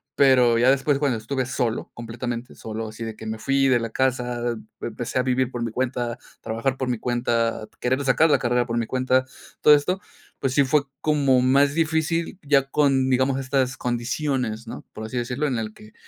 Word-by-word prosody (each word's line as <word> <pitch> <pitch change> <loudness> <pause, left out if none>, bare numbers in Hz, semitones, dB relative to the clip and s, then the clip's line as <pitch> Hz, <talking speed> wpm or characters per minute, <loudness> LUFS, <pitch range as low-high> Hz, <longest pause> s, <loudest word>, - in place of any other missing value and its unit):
Pero 125 -4 +5
ya 125 +2 +5
después, 140 +1 +1
bueno, 140 -5 +1
estuve 130 +4 -2
solo, 120 -3 -2
completamente 120 +1 -5
solo, 110 0 -5
así 110 +1 -8
de 110 - -6
que 110 - -10
me 110 0 -4
fui 135 +3 +2
de 130 -2 +4
la 115 0 -3
casa, 125 -2 -1 0.3
empecé 120 +2 -4
a - - +2
vivir 130 0 +1
por 120 -2 -3
mi 115 - -3
cuenta, 120 -1 -2 0.2
trabajar 115 +4 -2
por 130 - -2
mi 120 -3 -1
cuenta, 115 -2 -1
querer 130 +3 0
sacar 160 +5 +4
la 145 - +5
carrera 120 0 +1
por 115 -1 -2
mi 115 - 0
cuenta, 130 0 +1 0.4
todo 150 - +8
esto, 180 +6 0 0.4
pues 135 -1 -1
sí 140 +1 +4
fue 140 +2 +2 0.2
como 140 -4 +3
más 140 +2 +4
difícil 165 +2 0
ya 140 -2 +2
con, 135 -2 +2
digamos, 130 +1 +2
estas 130 -1 0
condiciones, 120 -2 -2
¿no? - - -8
Por 110 - -7
así 125 - -5
decirlo, 125 +5 -1
en 130 -4 -1
el 110 -1 -4
que, 105 0 -16
130 Hz, 200 wpm, -24 LUFS, 120-135 Hz, 0.4 s, todo